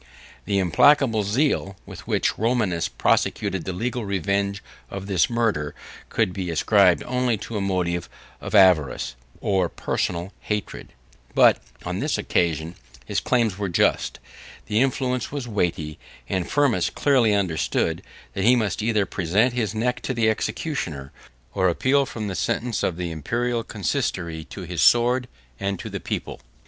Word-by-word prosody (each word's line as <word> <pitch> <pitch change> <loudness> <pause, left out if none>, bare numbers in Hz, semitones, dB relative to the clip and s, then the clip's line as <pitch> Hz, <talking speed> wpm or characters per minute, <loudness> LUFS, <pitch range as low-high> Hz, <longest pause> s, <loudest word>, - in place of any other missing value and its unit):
The 100 -1 0
implacable 115 - +4
zeal, 105 -2 0
with - - -11
which - - +1
Romanus 110 -7 0
prosecuted 95 -3 0
the 95 - -2
legal 120 +6 -3
revenge 100 +1 -1 0.3
of 100 0 -6
this 95 -3 +2
murder, 115 -11 0 0.3
could 90 - 0
be 95 -2 -4
ascribed 80 -3 +4
only 125 -2 0
to 105 +2 -7
a 105 - -1
motive 90 -3 -1 0.3
of - - -4
avarice, 90 -11 +4 0.3
or 95 -4 +1
personal 90 +3 -2
hatred; 105 -4 -4 0.4
but, - - +6 0.3
on - - -3
this - - 0
occasion, 80 -1 0 0.3
his 100 +8 -1
claims 115 -6 +1
were 100 -2 -1
just; 85 - +1 0.5
his 105 0 0
influence 125 -2 0
was 140 -4 -4
weighty; 85 -8 -2 0.3
and 95 +2 -2
Firmus 135 -11 +2
clearly 125 -7 +3
understood, 85 -3 0 0.3
that 95 - -2
he 120 +4 +6
must 110 -3 -1
either 110 -2 +1
present 100 +8 +1
his 110 -4 -1
neck 125 +3 -1
to 130 - -3
the 110 -2 +3
executioner, 85 - -3 0.4
or 95 -2 +2
appeal 135 +10 +2
from 110 -3 -5
the 95 - -3
sentence 115 +4 -1
of 85 - -1
the 90 -2 -3
Imperial 120 +9 -1
consistory, 85 -5 -2
to 95 - -9
his 85 -2 -3
sword, 125 +1 +4 0.3
and 100 0 -1
to - - -7
the - - -4
people. - - -5
100 Hz, 150 wpm, -24 LUFS, 90-120 Hz, 0.5 s, but